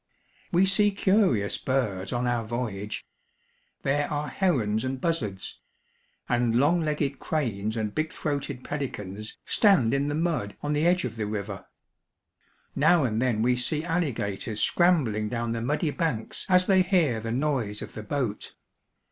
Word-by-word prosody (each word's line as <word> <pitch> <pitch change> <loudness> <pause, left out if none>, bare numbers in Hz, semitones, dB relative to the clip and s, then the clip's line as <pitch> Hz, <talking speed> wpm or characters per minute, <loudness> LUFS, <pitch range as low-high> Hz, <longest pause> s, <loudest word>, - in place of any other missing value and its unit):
We 180 +2 +4
see 205 +2 +4
curious 195 - +2
birds 105 -8 -1
on 120 0 -1
our 120 -2 0
voy 120 +2 -2
age. 100 +2 -6 0.8
There 145 +1 +1
are 150 0 -2
herons 115 - +1
and 130 0 -2
buzzards; 120 - -2 0.7
and 120 -1 +1
long 165 +6 +3
legged 150 -3 -1
cranes 110 -8 -2
and 105 -2 -2
big 155 0 -1
throated 140 -3 -3
pelicans 105 -8 -5
stand 185 - +4
in 140 +1 +1
the 145 - -1
mud 160 -11 -1
on 145 0 0
the 150 +3 +2
edge 180 0 +3
of - - -5
the 105 -2 -2
river. 100 -2 -5 1.1
Now 175 -4 +4
and 110 -2 0
then 120 -4 +1
we 125 +1 +3
see 150 +5 -1
alligators 115 - -2
scrambHng 120 -8 +2
down 120 0 -2
the 115 0 -2
muddy 150 +5 0
banks 155 - -2
as 185 0 +5
they 190 -1 +5
hear 175 - +2
the 115 +1 -4
noise 125 -6 -1
of - - -10
the 110 - -6
boat. 115 -2 -3
130 Hz, 155 wpm, -27 LUFS, 110-155 Hz, 1.1 s, as